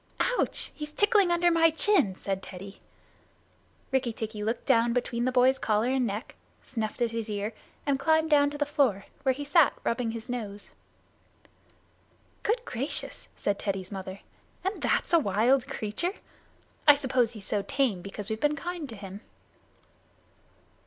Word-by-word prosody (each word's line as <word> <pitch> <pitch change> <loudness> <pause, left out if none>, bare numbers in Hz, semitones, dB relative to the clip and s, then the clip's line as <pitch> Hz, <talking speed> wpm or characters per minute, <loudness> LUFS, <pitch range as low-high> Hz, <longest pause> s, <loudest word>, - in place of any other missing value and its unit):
"Ouch! - - +1
He's 300 -1 -7
tickling 410 +1 +4
under 345 0 +3
my 330 -1 +5
chin," 320 - +3
said 195 0 -3
Teddy. 195 +1 -10 1.1
Rikki 265 -2 +1
tikki 220 -1 -5
looked 225 +3 -2
down 235 +1 +3
between 240 -1 -1
the 255 - +1
boy's 255 +1 +4
collar 215 +2 +1
and 260 -2 +1
neck, 210 +4 -5 0.3
snuffed 225 -1 -3
at 235 - 0
his 230 -1 -4
ear, 210 +1 -3 0.3
and 275 -2 +1
climbed 315 +2 +2
down 285 -1 +5
to 290 - -7
the 290 - +1
floor, 270 -10 +1 0.2
where 265 -2 +2
he 290 - -5
sat 290 -1 +4
rubbing 230 0 0
his 225 +1 -6
nose. 210 -5 -5 1.7
"Good 475 +3 0
gracious," 255 +5 -2
said 200 -1 -1
Teddy's 195 -2 -3
mother, 190 0 -6 0.4
"and 385 +3 -2
that's - - 0
a 335 - +7
wild 240 +3 +2
creature! 220 - -2 0.7
I 290 - +10
suppose 255 -4 +1
he's 210 -4 -9
so 205 - 0
tame 245 -5 0
because 200 +3 -6
we've 220 - -3
been 295 0 +2
kind 345 -1 -5
to 225 - -7
him." 195 0 -9
245 Hz, 160 wpm, -28 LUFS, 210-290 Hz, 1.7 s, I